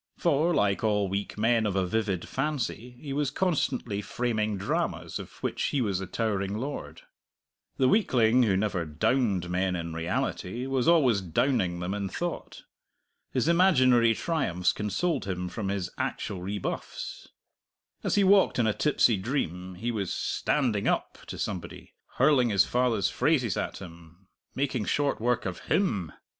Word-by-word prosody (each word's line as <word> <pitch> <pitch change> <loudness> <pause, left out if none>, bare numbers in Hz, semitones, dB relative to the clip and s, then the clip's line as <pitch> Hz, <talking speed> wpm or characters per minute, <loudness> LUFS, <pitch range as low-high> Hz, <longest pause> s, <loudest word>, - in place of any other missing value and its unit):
For, 165 0 +2
like 105 - +1
all 105 -2 +2
weak 100 +2 -3
men 115 0 +2
of 100 - -2
a 95 -1 +2
vivid 95 -2 -1
fancy, 125 -4 -3
he 140 -1 -6
was 145 -1 0
constantly 140 - -1
framing 110 -2 -1
dramas 95 - -2
of - - -8
which - - -1
he 145 - 0
was 100 -7 0
the 95 - -5
towering 100 -2 -1
lord. 140 +5 -6 0.7
The 130 - +3
weakling 125 - +4
who 100 -6 +3
never 100 -4 0
"downed" 90 - 0
men 90 +1 0
in 85 -1 -4
reality 90 +7 -2
was 135 0 0
always 135 -12 +4
"downing" 90 - 0
them 90 +2 -2
in 100 -1 -3
thought. 175 - -5 0.7
His - - 0
imaginary 130 -10 +5
triumphs 105 - 0
consoled 130 - -1
him 90 -2 -3
for 95 +5 -6
his 100 -2 -2
actual 95 - -3
rebuffs. 100 +1 -5 0.8
As - - 0
he 205 - +4
walked 195 0 +5
in 120 - +2
a 110 - +2
tipsy 125 -6 +3
dream, 95 - -3
he 115 +6 -2
was 100 -5 -2
"standing 120 -9 0
up" - - -1
to - - -6
somebody, - - -5 0.2
hurling 130 -3 +4
his 100 -4 +4
father's 120 -4 +1
phrases 130 - +1
at - - -3
him, 85 0 -13 0.3
making 130 -5 -1
short 145 -1 0
work 120 +1 +1
of 95 -2 -4
him! 105 - +1
110 Hz, 155 wpm, -28 LUFS, 95-135 Hz, 0.8 s, imaginary